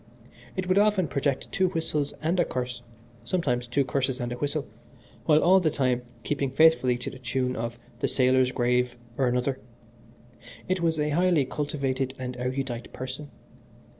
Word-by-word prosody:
It 185 -1 -2
would 185 +2 +4
often 205 -4 +3
project 140 -1 -1
two 190 -1 +2
whistles 155 -4 -1
and 170 +3 +1
a - - +6
curse, 125 -4 -4 0.4
sometimes 125 -9 0
two 135 +3 +1
curses 130 -1 -1
and 120 -1 -3
a - - -4
whistle, 145 +3 -2 0.6
while 155 -1 +5
all 190 +2 +6
the 170 -4 +2
time 130 -4 +1 0.2
keeping 140 -2 -1
faithfully 135 -3 +4
to 125 - -5
the 130 - -11
tune 125 +1 -1
of 115 +1 -4 0.2
'The - - +1
Sailor's 130 -1 +3
Grave' 125 -1 +1 0.2
or 130 0 +2
another. 125 +2 0 1.1
It 185 -1 0
was 165 -2 +1
a 150 0 +1
highly 170 -2 +3
cultivated 135 -2 -2
and 125 -1 -5
erudite 125 -1 -3
person. 130 +3 -6
135 Hz, 165 wpm, -27 LUFS, 125-155 Hz, 1.1 s, a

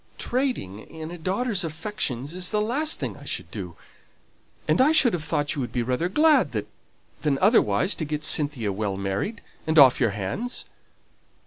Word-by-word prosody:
Trading 245 - -2
in 160 +7 -9
a 175 - -7
daughter's 195 +3 0
affections 160 - -4
is 180 0 -3
the 210 - 0
last 275 +9 0
thing - - -4
I - - -13
should - - -4
do; - - -7 0.9
and - - +3
I 285 +4 +5
should 260 -7 +5
have 170 -3 -2
thought 145 -2 -1
you 145 - -3
would 120 - -4
be 120 - -1
rather 130 +8 -1
glad 305 +8 +4 0.7
than 145 -3 +1
otherwise 200 - +3
to 160 - -4
get 150 0 -3
Cynthia 145 -9 +1
well 100 -1 -2
married, 100 - -3 0.2
and 160 0 +1
off 135 -4 +8
your 120 - +3
hands." 105 - -4
160 Hz, 175 wpm, -25 LUFS, 125-215 Hz, 0.9 s, off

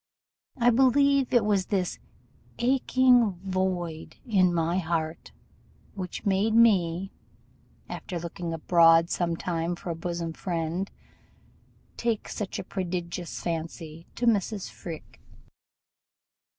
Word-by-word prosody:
I 245 -1 +4
believe 270 +2 +4
it 240 -4 +4
was 200 -3 +1
this 190 -4 -1 0.6
'aching 250 -3 +3
void' 185 -4 -2
in 190 -7 +3
my 170 +1 +1
heart 160 -2 -3 0.6
which 185 -3 -6
made 200 +3 +2
me, 195 -5 +3 0.8
after 180 -3 -5
looking 170 0 -5
abroad 165 0 +4
some 170 -2 0
time 170 0 -2
for 175 0 -6
a - - -3
bosom 170 -1 -4
friend, 170 +2 -3 1.1
take 230 -3 -1
such 205 -3 -4
a - - -4
prodigious 175 -2 -4
fancy 165 -1 -5
to 245 - -2
Mrs. 210 -3 +1
Freke. 165 -3 -9
180 Hz, 110 wpm, -27 LUFS, 170-215 Hz, 1.1 s, I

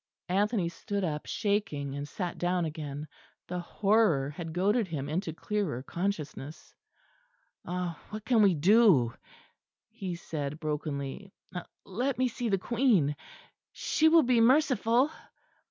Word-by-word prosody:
Anthony 200 0 +1
stood 200 +4 -4
up 150 -4 -3
shaking; 200 -10 -1
and 145 +1 -4
sat 175 +2 -4
down 175 -1 +1
again. 150 -1 -5 0.4
The 180 0 -3
horror 175 -7 +2
had 165 +1 -6
goaded 200 +6 +1
him 145 -5 -4
into 165 +3 -2
clearer 170 - -2
consciousness. 160 -5 -4 0.9
"Ah! 180 -2 -3
what 215 0 -7
can 230 -2 +4
we 195 -4 +5
do?" 170 - +5 0.8
he 185 -3 -5
said 150 -3 -5
brokenly. 150 +3 -4 0.5
"Let 245 +8 -1
me 255 0 +2
see 240 0 -3
the 195 - +3
Queen. 205 - +2 0.6
She 315 0 +2
will 325 0 +6
be 245 -2 +3
merciful." 255 0 +4
180 Hz, 125 wpm, -29 LUFS, 150-215 Hz, 0.9 s, will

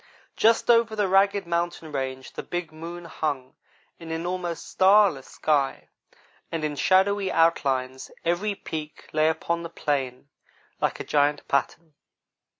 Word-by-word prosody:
Just 230 +2 +4
over 230 -1 +3
the 205 -2 +1
ragged 195 +1 +3
mountain 170 -2 -2
range 130 -2 -4
the - - -5
big 175 -3 -4
moon 170 +2 -8
hung 145 -5 -3 0.5
in 165 -1 -9
an 165 +1 -3
almost 175 -3 -3
starless 190 -7 +4
sky, 145 -3 0 0.6
and 165 -2 -3
in 150 -1 -1
shadowy 195 +4 +3
outline 135 -6 +1 0.3
every 190 +5 0
peak 155 -4 -7
lay 155 +1 +3
upon 170 +1 -1
the 170 - -6
plain 140 -5 -2 0.5
like - - -1
a - - -3
giant 145 0 +1
pattern. 155 +3 -1
165 Hz, 140 wpm, -25 LUFS, 145-185 Hz, 0.6 s, Just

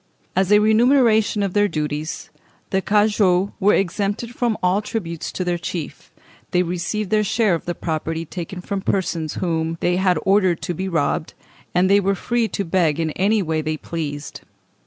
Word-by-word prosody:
As 190 +1 +2
a 210 - +8
remuneration 220 -1 +4
for - - +2
their 205 +2 +2
duties, 150 -2 -4 0.4
the 190 - +1
cagoux 205 -2 +2
were 205 +1 +4
exempt 200 +4 -1
from 240 -2 -1
all 185 +3 +3
tribute 170 -7 -4
to 185 - -3
their 175 -1 -1
chief; 170 -2 -6 0.4
they 180 0 +2
received 180 +4 -3
their 215 -1 +3
share 215 -1 +2
of 165 - -2
the 175 - -3
property 160 0 -3
taken 175 +2 -6
from 195 +1 -3
persons 170 -5 -1
whom 165 -2 -1
they 175 0 +1
had 185 -2 +2
ordered 190 -3 +3
to 175 +2 -2
be 190 +3 -3
robbed, 160 0 -1 0.4
and 180 +1 +4
they 200 +1 +5
were 195 0 +1
free 235 +3 0
to 200 -2 -3
beg 165 -3 +1
in 160 -1 0
any 200 +5 +1
way 160 -2 -1
they 155 0 -2
pleased. 145 -3 -5
185 Hz, 180 wpm, -21 LUFS, 165-205 Hz, 0.4 s, a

